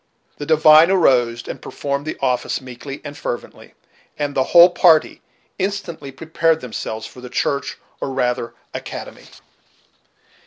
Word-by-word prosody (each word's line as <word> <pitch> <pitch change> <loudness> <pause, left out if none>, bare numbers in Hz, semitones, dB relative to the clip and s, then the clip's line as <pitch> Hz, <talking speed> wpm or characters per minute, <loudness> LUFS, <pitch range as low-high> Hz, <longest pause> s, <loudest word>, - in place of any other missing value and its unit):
The 145 - -6
divine 155 +1 +6
arose 125 -10 +2
and - - -7
performed 140 +1 -4
the - - -4
office 125 -2 0
meekly 130 +2 -9
and 145 -1 -8
fervently, 120 -4 -7 0.4
and 145 -1 -2
the 130 - +1
whole 175 +3 +7
party 165 -3 +3 0.4
instantly 185 -7 -4
prepared 160 +3 0
themselves 110 -3 -6
for 125 - -12
the 125 - -9
church 140 +2 -2 0.2
or - - -3
rather 125 -2 -2 0.2
academy. - - -8
140 Hz, 130 wpm, -20 LUFS, 125-160 Hz, 0.4 s, whole